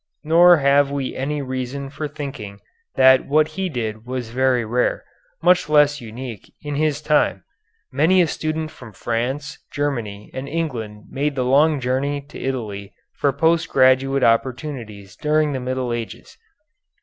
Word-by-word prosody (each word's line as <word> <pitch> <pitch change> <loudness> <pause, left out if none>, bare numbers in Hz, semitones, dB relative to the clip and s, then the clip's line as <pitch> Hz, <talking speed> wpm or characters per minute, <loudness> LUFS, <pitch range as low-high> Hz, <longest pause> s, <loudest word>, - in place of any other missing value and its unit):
Nor 170 +3 +6
have 140 0 +3
we 140 -2 -3
any 145 +2 -2
reason 130 +1 -4
for 150 +1 -4
thinking 140 -9 -7 0.4
that 130 0 +5
what 155 +2 +3
he 185 +4 -3
did 110 -6 -4
was 125 -2 -5
very 125 -1 +1
rare, 120 +3 0 0.4
much 180 -3 +4
less 145 -1 +4
unique, 115 -1 -8
in 145 -1 -4
his 150 0 0
time. 145 - +2 0.5
Many 160 +8 +3
a 175 - +5
student 155 0 -3
from 115 -4 -13
France, 125 +7 -3
Germany, 115 -8 -3
and 135 +1 -6
England 115 -10 -4
made 145 +1 -1
the 130 -2 -1
long 145 +3 +4
journey 135 +3 -1
to - - -9
Italy 105 -7 -5 0.2
for 140 - +1
post 160 +4 +1
graduate 135 +1 +3
opportunities 115 -5 -1
during 150 0 +1
the 130 - -2
later 125 - -8
Middle 130 -1 -2
Ages. 115 -1 -7
135 Hz, 150 wpm, -21 LUFS, 120-150 Hz, 0.5 s, Nor